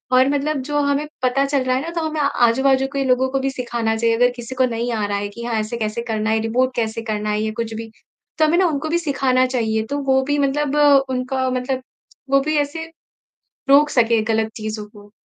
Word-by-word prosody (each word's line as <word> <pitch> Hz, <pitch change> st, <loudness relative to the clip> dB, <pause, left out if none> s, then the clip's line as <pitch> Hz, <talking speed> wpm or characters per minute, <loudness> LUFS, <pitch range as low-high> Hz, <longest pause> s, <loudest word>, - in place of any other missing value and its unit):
और 255 Hz, +1 st, +5 dB
मतलब 285 Hz, 0 st, -1 dB
जो 295 Hz, 0 st, +1 dB
हमें 285 Hz, +1 st, 0 dB, 0.2 s
पता 255 Hz, +2 st, +2 dB
चल 275 Hz, -1 st, 0 dB
रहा 255 Hz, 0 st, +1 dB
है 260 Hz, -, 0 dB
ना 325 Hz, -, -5 dB
तो -, -, -1 dB
हमें 310 Hz, 0 st, -4 dB
आजू-बाजू 265 Hz, 0 st, +2 dB
के 275 Hz, -1 st, 0 dB
लोगों 260 Hz, 0 st, +2 dB
को 270 Hz, +1 st, -1 dB
भी 270 Hz, 0 st, -1 dB
सिखाना 235 Hz, -4 st, -2 dB
चाहिए, 230 Hz, 0 st, +1 dB
अगर 245 Hz, +2 st, +4 dB
किसी 240 Hz, +1 st, -8 dB
को 260 Hz, 0 st, +3 dB
नहीं 235 Hz, 0 st, -2 dB
आ 215 Hz, -2 st, -1 dB
रहा 205 Hz, 0 st, -1 dB
है 205 Hz, 0 st, -3 dB
कि 235 Hz, +3 st, -9 dB
हाँ 235 Hz, -1 st, -2 dB
ऐसे 215 Hz, +2 st, -3 dB
कैसे 215 Hz, 0 st, -2 dB
करना 220 Hz, 0 st, -1 dB
है, 220 Hz, 0 st, +2 dB
रिपोर्ट 250 Hz, +3 st, 0 dB
कैसे 230 Hz, -1 st, -2 dB
करना 210 Hz, 0 st, -2 dB
है 210 Hz, 0 st, 0 dB
या 215 Hz, 0 st, -1 dB
कुछ 230 Hz, -1 st, -3 dB
भी। 225 Hz, 0 st, -7 dB, 0.5 s
तो 315 Hz, -, +4 dB
हमें 315 Hz, +3 st, +2 dB
ना 375 Hz, -, +4 dB
उनको 310 Hz, -1 st, -2 dB
भी 340 Hz, -, +2 dB
सिखाना 265 Hz, -5 st, +1 dB
चाहिए, 225 Hz, -4 st, -1 dB
तो 285 Hz, +5 st, -3 dB
वो 265 Hz, -1 st, +3 dB
भी 290 Hz, +2 st, 0 dB
मतलब 285 Hz, +1 st, 0 dB, 0.3 s
उनका 260 Hz, 0 st, -1 dB
मतलब 255 Hz, +1 st, -2 dB, 0.5 s
वो 275 Hz, 0 st, +5 dB
भी 310 Hz, +2 st, -1 dB
ऐसे 295 Hz, +3 st, -2 dB, 0.8 s
रोक 290 Hz, +2 st, +6 dB
सके 230 Hz, -4 st, +3 dB
गलत 220 Hz, 0 st, 0 dB
चीज़ों 215 Hz, -1 st, -5 dB
को। 205 Hz, -1 st, -16 dB
255 Hz, 230 wpm, -20 LUFS, 225-275 Hz, 0.8 s, रोक